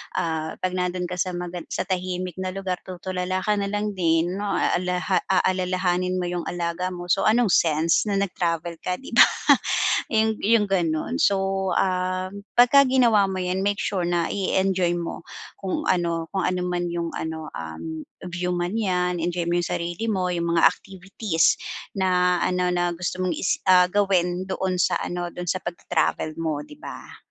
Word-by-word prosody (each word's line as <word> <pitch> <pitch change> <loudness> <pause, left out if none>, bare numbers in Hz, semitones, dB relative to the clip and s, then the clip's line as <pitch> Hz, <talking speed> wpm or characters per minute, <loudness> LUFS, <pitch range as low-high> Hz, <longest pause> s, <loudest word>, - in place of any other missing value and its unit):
ah, 160 -1 -2
'pag 185 - -2
nandun 180 0 -2
ka 180 0 -4
sa 185 0 -1
maga 175 0 -5
sa - - -2
tahimik 185 -1 -3
na 185 0 -3
lugar, 190 -2 -3
tutulala 185 0 -3
ka 210 -1 +1
na 200 - -1
lang 210 +1 -1
din, 175 0 +1
a 200 -3 +1
aha 180 +1 0
aalalahanin 185 -1 +1
mo 185 - -1
'yung 175 -1 -3
alaga 175 +1 -2
mo, 175 0 -4
so, 195 - +3
anong 225 -1 +3
sense 165 +4 +3
na 205 - 0
nag-travel 170 -4 -1
ka, 180 +2 -2
'di 265 - -11
ba? - - +8 0.8
'Yu 220 -1 +1
'yung 225 +1 +3
gano'n. 190 - -1
So, 195 -5 +1
ah, 185 0 0 0.2
'pagka 260 +3 +6
ginawa 235 -6 +4
mo 190 - -3
'yan, 185 +1 -1
make 205 0 0
sure 185 -3 -1
na 170 -1 0
i-enjoy 190 -2 +1
mo 170 -1 -5 0.3
kung 190 -1 -3
ano, 170 -2 0
kung 190 +1 -1
ano 180 0 0
man 180 0 -1
'yung 170 -1 -2
ano, 160 -1 -5
um, 80 - -6 0.2
view 180 +1 -2
man 175 +4 -2
'yan, 180 -4 0
enjoy 170 0 -2
mo 175 - +2
'yung 175 - 0
sarili 175 +4 -3
mo, 190 -5 0
'yung 170 -1 -1
mga 165 - +3
activities 190 -2 0 0.4
na 180 -1 +3
ano 180 0 +1
na 175 -1 0
gusto 180 +1 -3
mong 185 -1 0
i - - -6 0.2
ah, 180 -1 +6
gawin 185 -2 +1
doon 190 -1 -2
sa 180 0 +2
ano, 175 -1 -4
doon 180 -1 -5
sa 185 - +1
pag-ta-travel 165 -2 -1
mo, 160 -3 -2
'di 295 - -13
ba? - - -10
180 Hz, 175 wpm, -24 LUFS, 175-190 Hz, 0.8 s, ba